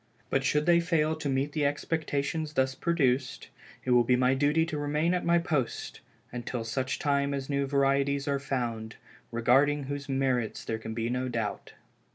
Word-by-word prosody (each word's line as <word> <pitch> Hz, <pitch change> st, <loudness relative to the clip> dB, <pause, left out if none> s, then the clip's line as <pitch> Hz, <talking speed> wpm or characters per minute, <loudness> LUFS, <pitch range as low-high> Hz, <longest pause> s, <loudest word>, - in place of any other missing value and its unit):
But 135 Hz, -, +2 dB
should 150 Hz, +2 st, +1 dB
they 170 Hz, -1 st, +5 dB
fail 160 Hz, -2 st, +1 dB
to 150 Hz, -2 st, -3 dB
meet 135 Hz, +2 st, 0 dB
the 150 Hz, 0 st, -1 dB
expectations 150 Hz, +1 st, -1 dB
thus 130 Hz, -1 st, +1 dB
produced, 135 Hz, -6 st, 0 dB, 0.4 s
it 130 Hz, -, 0 dB
will 120 Hz, -1 st, +6 dB
be 125 Hz, +2 st, +3 dB
my 125 Hz, +1 st, +3 dB
duty 145 Hz, +4 st, +2 dB
to 160 Hz, -2 st, -4 dB
remain 150 Hz, +4 st, +1 dB
at 180 Hz, -, 0 dB
my 170 Hz, 0 st, +4 dB
post 150 Hz, -6 st, -2 dB, 0.3 s
until 120 Hz, -1 st, -4 dB
such 130 Hz, +3 st, -2 dB
time 140 Hz, -1 st, +1 dB
as 135 Hz, +1 st, -4 dB
new 140 Hz, 0 st, 0 dB
varieties 140 Hz, +1 st, +1 dB
are 140 Hz, -1 st, +1 dB
found, 120 Hz, -5 st, -3 dB, 0.4 s
regarding 135 Hz, +5 st, +3 dB
whose 140 Hz, +1 st, -5 dB
merits 130 Hz, -4 st, 0 dB
there 110 Hz, -, -2 dB
can 110 Hz, 0 st, -6 dB
be 115 Hz, 0 st, -1 dB
no 125 Hz, +1 st, -1 dB
doubt. 115 Hz, -3 st, -4 dB
140 Hz, 180 wpm, -29 LUFS, 125-150 Hz, 0.4 s, will